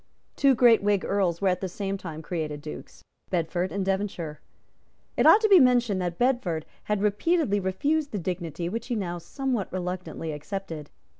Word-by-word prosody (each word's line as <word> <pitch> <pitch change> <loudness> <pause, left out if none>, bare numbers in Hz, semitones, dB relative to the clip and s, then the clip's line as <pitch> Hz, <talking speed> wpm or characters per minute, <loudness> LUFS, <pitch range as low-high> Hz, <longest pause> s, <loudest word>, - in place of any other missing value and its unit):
Two 275 -2 +4
great 235 -1 +6
Whig 200 -1 +1
Earls 190 -4 0
were 195 - +2
at 180 -1 -1
the 190 - -2
same 195 +2 -3
time 160 -5 -7
created 155 -3 -3
Dukes, 75 - -10 0.3
Bedford 175 +1 -1
and 195 -1 -2
Devonshire. 190 -6 -2 0.7
It - - +4
ought 430 - +8
to 435 - +4
be 390 -3 +8
mentioned 245 -7 +3
that 175 -1 -3
Bedford 240 - 0 0.2
had 210 -1 0
repeatedly 210 - +2
refused 280 +12 0
the 210 - -2
dignity 175 -2 -3
which 230 +6 -4
he 245 - -1
now 175 -5 -3
somewhat 255 - -3
reluctantly 180 -3 -4
accepted. 155 0 -6
190 Hz, 170 wpm, -26 LUFS, 170-230 Hz, 0.7 s, ought